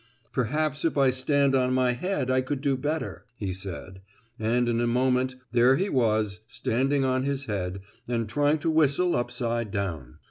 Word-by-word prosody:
"Perhaps 145 +4 0
if 165 - 0
I 135 -2 +5
stand 135 +2 +2
on 130 -1 +2
my 130 -1 +3
head 130 0 -1
I 130 0 +3
could 130 +2 -3
do 140 -2 +1
better," 150 +4 -3
he 100 -5 -3
said, 95 0 -7 0.4
and 120 +3 +1
in 120 0 +1
a 120 - +1
moment 125 +1 +1 0.2
there 125 +2 +5
he 195 +8 0
was 110 - +1
standing 130 +4 0
on 130 0 +1
his 140 0 -2
head 95 -3 -3 0.3
and 115 -2 -1
trying 145 +7 +2
to 165 - +1
whistle 160 +3 +3
upside 120 -2 -1
down. 85 -11 -4
130 Hz, 175 wpm, -26 LUFS, 115-140 Hz, 0.4 s, I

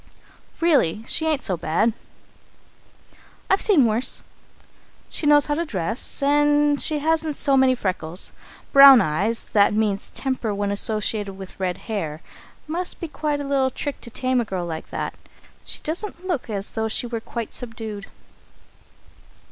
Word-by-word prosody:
"Really, 265 - +2
she 320 +5 +1
isn't 305 -4 0
so 190 - -1
bad 170 +8 0 1.6
I've 385 - +4
seen 355 - +5
worse. 225 +3 -1 0.9
She 300 - -3
knows 290 -1 +5
how 295 - -1
to 330 +3 -1
dress, 220 - -2
and 295 0 +3
she 310 - 0
hasn't 315 0 0
so 275 -1 +2
many 260 -1 +4
freckles. 185 -5 -3 0.4
Brown 275 -2 +10
eyes 200 +8 0
that 205 0 +4
means 210 -2 0
temper 255 -6 -3
when 200 0 -1
associated 210 -1 +2
with 190 -1 -11
red 185 -2 -2
hair. 165 -9 -4 0.5
Must 345 +4 -2
be 335 - -4
quite 300 -1 -2
a - - -4
little 275 -1 +1
trick 285 +2 -5
to 235 - -7
tame 255 +1 0
a - - -3
girl 185 -4 -4
like 160 -2 -6
that. - - -4 0.5
She - - -7
doesn't 350 +3 -4
look 340 -11 -3
as 200 -2 -4
though 220 0 -2
she 220 - -2
were 230 -1 -4
quite 230 -1 -6
subdued. 220 -4 -7
240 Hz, 155 wpm, -22 LUFS, 205-295 Hz, 1.6 s, Brown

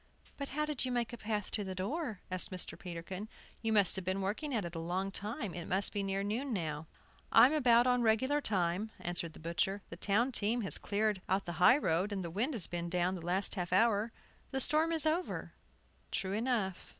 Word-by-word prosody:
"But 280 -1 -5
how 300 +2 -1
did 300 -4 -1
you 255 - -1
make 240 -1 -1
a - - -5
path 210 -2 -2
to 210 - -1
the 190 -1 -5
door?" 220 - -3
asked 185 -1 +4
Mr. 185 -1 -4
Peterkin. 180 +4 -7 0.3
"You 225 -1 0
must 205 -4 +4
have 190 - -2
been 185 +2 -1
working 210 +10 -2
at 210 -5 0
it 170 - -6
a 165 - -4
long 185 +4 -2
time. 210 - -4
It 175 -2 -6
must 190 +2 +2
be 205 - -1
near 195 0 -1
noon 235 +7 -2
now." 155 -5 -3 0.4
"I'm 245 +6 +7
about 245 -5 +5
on 250 -1 +3
regular 260 +6 +2
time," 190 -1 0
answered 175 -2 -2
the - - -12
butcher. 180 +5 -1
"The 165 - -7
town 215 +8 +1
team 235 +1 +1
has 195 - 0
cleared 210 -1 0
out 190 +1 +1
the 175 - -4
high 250 +9 +8
road, 185 - 0
and 195 -2 -2
the 170 - -5
wind 240 - -1
has 205 - +2
been 170 0 -4
down 180 +1 +1
the 185 - -5
last 185 +3 +2
half 180 -3 -3
hour. 215 +3 +3 0.4
The 265 - -2
storm 310 +5 +3
is 320 -1 0
over." 325 +4 -1 0.6
True 190 0 -2
enough! 215 -5 -1
205 Hz, 220 wpm, -33 LUFS, 185-240 Hz, 0.6 s, high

